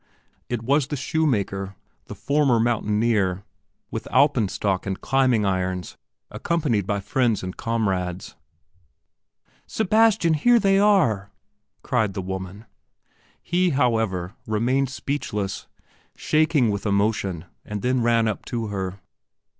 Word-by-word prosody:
It 120 Hz, -2 st, -3 dB
was 140 Hz, +2 st, +2 dB
the 150 Hz, -, -3 dB
shoemaker, 105 Hz, -, -1 dB, 0.3 s
the -, -, -8 dB
former 140 Hz, -5 st, +2 dB
mountaineer, 105 Hz, -4 st, +1 dB, 0.5 s
with -, -, -5 dB
Alpen 130 Hz, -5 st, +3 dB
stock 95 Hz, 0 st, -2 dB
and 95 Hz, -1 st, -3 dB
climbing 130 Hz, -5 st, +2 dB
irons, 95 Hz, -2 st, -2 dB, 0.4 s
accompanied 140 Hz, -, -1 dB
by 100 Hz, -1 st, 0 dB
friends 120 Hz, -2 st, 0 dB
and 90 Hz, 0 st, -5 dB
comrades. 95 Hz, -6 st, -2 dB, 1.3 s
"Sebastian, 220 Hz, -4 st, +3 dB
here 240 Hz, +11 st, +4 dB
they 195 Hz, -3 st, +3 dB
are!" 160 Hz, -, +3 dB, 0.5 s
cried 110 Hz, -6 st, 0 dB
the 95 Hz, -, -2 dB
woman. 95 Hz, +3 st, -6 dB, 0.8 s
He, 180 Hz, +1 st, +1 dB
however, 110 Hz, -8 st, 0 dB
remained 125 Hz, +5 st, +1 dB
speechless, 105 Hz, -8 st, -4 dB, 0.5 s
shaking 155 Hz, -7 st, +2 dB
with 100 Hz, +1 st, -3 dB
emotion, 100 Hz, -4 st, 0 dB, 0.2 s
and 105 Hz, -1 st, -6 dB
then 125 Hz, 0 st, +1 dB
ran 115 Hz, -1 st, +2 dB
up 110 Hz, -, -3 dB
to 115 Hz, -3 st, -3 dB
her. 95 Hz, -1 st, -4 dB
115 Hz, 115 wpm, -23 LUFS, 100-140 Hz, 1.3 s, here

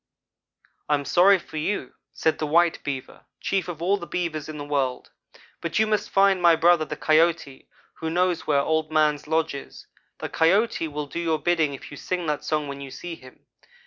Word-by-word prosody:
"'I 150 Hz, -, +4 dB
am 140 Hz, -1 st, -4 dB
sorry 190 Hz, +5 st, +5 dB
for 160 Hz, -3 st, -10 dB
you, 200 Hz, +7 st, -2 dB
' -, -, -61 dB
said 160 Hz, -, 0 dB
the 155 Hz, -, -1 dB
white 170 Hz, +2 st, +2 dB
Beaver 135 Hz, -3 st, -6 dB
chief 195 Hz, -2 st, -1 dB
of 170 Hz, -2 st, -6 dB
all 195 Hz, +3 st, +2 dB
the 175 Hz, -3 st, -8 dB
Beavers 155 Hz, -4 st, -3 dB
in 155 Hz, -, -6 dB
the 145 Hz, -, -6 dB
world 135 Hz, -3 st, -2 dB, 0.5 s
'but 170 Hz, -, -2 dB
you 220 Hz, -, +4 dB
must 215 Hz, -1 st, -1 dB
find 195 Hz, -1 st, +3 dB
my 170 Hz, -1 st, +6 dB
brother 165 Hz, 0 st, +4 dB
the 150 Hz, -, -6 dB
Coyote, 155 Hz, -3 st, +1 dB, 0.3 s
who 160 Hz, -, -3 dB
knows 180 Hz, +1 st, 0 dB
where 145 Hz, -2 st, +3 dB
Old 160 Hz, +1 st, 0 dB
man's 150 Hz, -1 st, +2 dB
lodge 160 Hz, 0 st, 0 dB
is. 140 Hz, -, -9 dB, 0.3 s
The -, -, -5 dB
Coyote 180 Hz, +1 st, +2 dB
will 150 Hz, -1 st, -4 dB
do 145 Hz, -, -6 dB
your 165 Hz, -2 st, 0 dB
bidding 155 Hz, -2 st, +1 dB
if -, -, -12 dB
you 145 Hz, -, -9 dB
sing 180 Hz, +2 st, -3 dB
that 150 Hz, -2 st, -2 dB
song 150 Hz, -2 st, -1 dB
when 140 Hz, 0 st, -7 dB
you 135 Hz, -, -7 dB
see 175 Hz, +5 st, -7 dB
him. 130 Hz, -5 st, -14 dB
160 Hz, 210 wpm, -24 LUFS, 150-175 Hz, 0.5 s, my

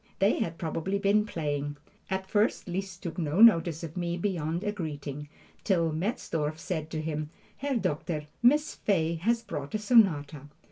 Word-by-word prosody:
They 195 Hz, +2 st, +3 dB
had 170 Hz, -7 st, -2 dB
probably 165 Hz, +4 st, -2 dB
been 205 Hz, +2 st, +2 dB
playing. 145 Hz, -4 st, -3 dB, 0.3 s
At 190 Hz, 0 st, -2 dB
first 210 Hz, +3 st, +1 dB
Liszt 185 Hz, +1 st, -4 dB
took 170 Hz, +1 st, -4 dB
no 160 Hz, +2 st, -1 dB
notice 170 Hz, -8 st, +6 dB
of 160 Hz, -1 st, -6 dB
me 175 Hz, -1 st, -2 dB
beyond 170 Hz, -2 st, -1 dB
a 205 Hz, -, 0 dB
greeting, 145 Hz, -6 st, -5 dB, 0.3 s
till 170 Hz, -5 st, +2 dB
Metzdorf 155 Hz, -4 st, -2 dB
said 160 Hz, -2 st, -4 dB
to 155 Hz, -1 st, -3 dB
him, 155 Hz, -1 st, -3 dB, 0.3 s
"Herr 280 Hz, 0 st, -1 dB
Doctor, 155 Hz, -6 st, -2 dB, 0.2 s
Miss 295 Hz, +6 st, +4 dB
Fay 165 Hz, -5 st, +1 dB
has 230 Hz, +8 st, 0 dB
brought 145 Hz, +6 st, -5 dB
a -, -, +3 dB
sonata." 165 Hz, -, +3 dB
170 Hz, 160 wpm, -29 LUFS, 155-205 Hz, 0.3 s, notice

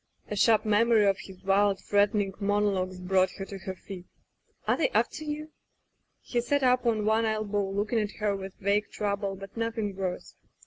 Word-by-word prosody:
..." -, -, -39 dB
A -, -, -1 dB
sharp 215 Hz, +1 st, +4 dB
memory 215 Hz, 0 st, +4 dB
of 195 Hz, -1 st, +2 dB
his 190 Hz, -1 st, -12 dB
wild, 195 Hz, 0 st, +3 dB
threatening 205 Hz, -1 st, +1 dB
monologues 200 Hz, -3 st, 0 dB
brought 185 Hz, 0 st, +2 dB
her 195 Hz, -, -6 dB
to 195 Hz, 0 st, -8 dB
her 190 Hz, 0 st, -6 dB
feet. 185 Hz, -1 st, -10 dB, 0.6 s
"Are -, -, +4 dB
they -, -, +1 dB
after 310 Hz, -, +1 dB
you?'' 305 Hz, +1 st, -5 dB, 0.7 s
He 240 Hz, -, -1 dB
sat 285 Hz, +3 st, 0 dB
up 250 Hz, -1 st, +3 dB
on 215 Hz, -2 st, +1 dB
one 220 Hz, +1 st, +3 dB
elbow 215 Hz, -2 st, -1 dB
looking 210 Hz, +4 st, 0 dB
at 210 Hz, -1 st, -2 dB
her 210 Hz, -2 st, -1 dB
with 190 Hz, -1 st, -7 dB
vague 200 Hz, +2 st, 0 dB
trouble, 200 Hz, -1 st, -2 dB
but 195 Hz, 0 st, -11 dB
nothing 225 Hz, -3 st, -2 dB
worse. 185 Hz, -2 st, -4 dB
205 Hz, 185 wpm, -28 LUFS, 195-220 Hz, 0.7 s, sharp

